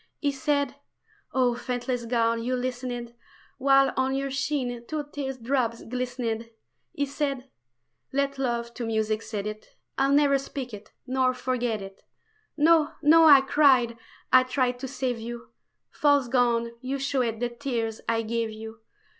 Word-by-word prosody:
He 285 - 0
said 285 -1 0 0.6
oh, 250 -2 +2
faithless 245 0 -3
gown, 230 -1 +1
you 250 +2 -1
listened 245 -1 -4 0.5
While 275 0 +4
on 265 0 +1
your 275 0 -2
sheen 260 -3 -2
two 310 -1 -2
tear 275 -2 -3
drops 240 -2 -1
glistened 240 -2 -3 0.4
He 285 - -1
said... 275 -2 -3 0.6
let 275 0 -1
love 235 -2 -2
to 235 - -4
music 220 -1 0
set 215 -3 -5
it, 215 0 -7 0.2
I'll 270 +1 +3
never 280 -1 +4
speak 265 -3 -6
it 210 0 -10
nor 255 0 +1
forget 245 -4 -1
it! 195 0 -11 0.6
"No, 320 0 +4
no!" 325 +2 +7
I 285 -3 +9
cried, 265 -4 +4 0.4
I 255 - +9
tried 255 -1 0
to 265 - -4
save 255 -2 -2
you 235 +1 -7 0.4
False 285 -3 +3
gown, 235 -2 +2
you 265 +2 -2
showed 260 -5 -1
the 245 0 -1
tears 235 -3 -3
I 230 0 +1
gave 230 0 -1
you! 220 +1 -9
255 Hz, 150 wpm, -26 LUFS, 235-275 Hz, 0.6 s, I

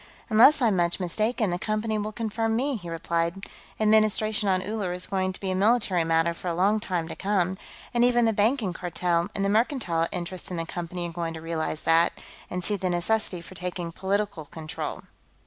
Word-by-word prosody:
"Unless 250 +6 +7
I'm 220 -4 +4
much 175 +1 +1
mistaken, 215 +3 0
the 175 - -2
Company 215 +1 -1
will 210 +1 -3
confirm 225 0 -1
me," 270 +4 0
he 175 -6 -7
replied. 170 +3 -2 0.3
"Administration 215 -1 +3
on 185 -1 +2
Uller 205 -4 -2
is 180 0 -2
going 190 -1 -1
to 185 - -10
be 190 -1 -2
a - - 0
military 200 -3 +3
matter 165 +1 +2
for 175 - -8
a 170 - 0
long 200 +5 +3
time 175 -5 -2
to - - -6
come, 190 -2 0 0.4
and 240 0 +3
even 240 -1 +4
the 225 - +3
Banking 210 -1 +1
Cartel 175 0 0
and 195 - 0
the - - +1
mercantile 210 - +1
interests 180 0 -5
in 180 - -4
the 165 - -2
Company 175 +1 -4
are - - -7
going 165 -1 -3
to - - -6
realize 160 -1 -3
that, 165 +1 +4 0.4
and 180 0 -3
see 205 +4 +1
the 190 -2 -1
necessity 180 +1 0
for 170 - -12
taking 180 -2 -4
political 195 -2 -2
control. 155 +1 -6
185 Hz, 200 wpm, -26 LUFS, 170-215 Hz, 0.4 s, Unless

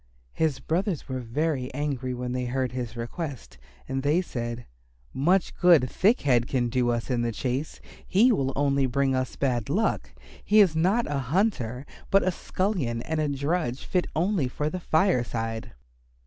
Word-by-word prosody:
His 155 -4 0
brothers 180 0 -1
were 130 -2 -3
very 130 +2 -2
angry 135 -3 -2
when 125 0 -4
they 125 0 -2
heard 130 0 -1
his 125 -2 -5
request, 130 - -6 0.3
and 135 0 -2
they 145 +5 +2
said, 120 -8 -4 0.5
"Much 175 +7 +2
good 170 -8 +5
Thick 215 - +2
head 120 -4 +2
can 120 -3 0
do 125 0 +1
us 120 +2 -1
in 120 -1 +1
the 120 0 0
chase. 130 +5 -3 0.3
He 230 +7 +5
will 135 - +1
only 140 -1 +2
bring 135 +1 +1
us 130 -1 -1
bad 125 -5 -1
luck. 210 +9 0 0.3
He 215 - +4
is 185 -6 +5
not 190 +9 +2
a 145 -1 -2
hunter 140 - 0 0.2
but 195 0 +4
a 185 - +2
scullion 170 - -2
and 160 0 -2
a 155 - +1
drudge 140 -1 -1
fit 180 -1 0
only 175 -3 +1
for 150 +4 -2
the 185 - -3
fireside." 120 - 0
140 Hz, 170 wpm, -26 LUFS, 125-170 Hz, 0.5 s, good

